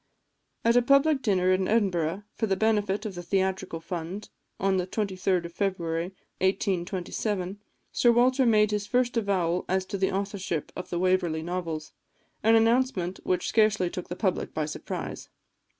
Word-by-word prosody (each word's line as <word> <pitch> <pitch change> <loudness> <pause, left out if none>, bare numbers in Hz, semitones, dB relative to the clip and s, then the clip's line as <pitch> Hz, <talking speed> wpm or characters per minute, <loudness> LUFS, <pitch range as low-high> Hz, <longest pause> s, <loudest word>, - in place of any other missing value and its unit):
At 230 +1 +4
a 245 - +6
public 275 +3 +4
dinner 185 -5 +2
in 185 0 +2
Edinburgh, 190 -4 +1
for 220 - -1
the 195 - +2
benefit 210 0 +1
of 210 - -4
the 175 - -6
Theatrical 190 -1 -1
Fund, 175 +4 -6 0.3
on 195 0 +2
the 180 0 -1
23d 190 -3 -1
of 170 - -8
February 170 -4 -1 0.3
1827, 190 +1 -1 0.3
Sir 240 - +4
Walter 255 +2 +4
made 210 -2 +4
his 205 -1 -2
first 245 +2 +1
avowal 185 -6 +1
as 190 0 +1
to 195 +1 -4
the 190 - +1
authorship 195 -5 -3
of 180 - -6
the 175 - -2
Waverley 180 -3 +1
Novels, 165 -3 -4 0.5
an 225 +1 +5
announcement 225 -5 +2
which 180 -1 0
scarcely 215 -5 +2
took 180 - -6
the 175 - -4
public 190 -2 -1
by 155 - 0
surprise. 150 - -6
190 Hz, 160 wpm, -27 LUFS, 180-215 Hz, 0.5 s, a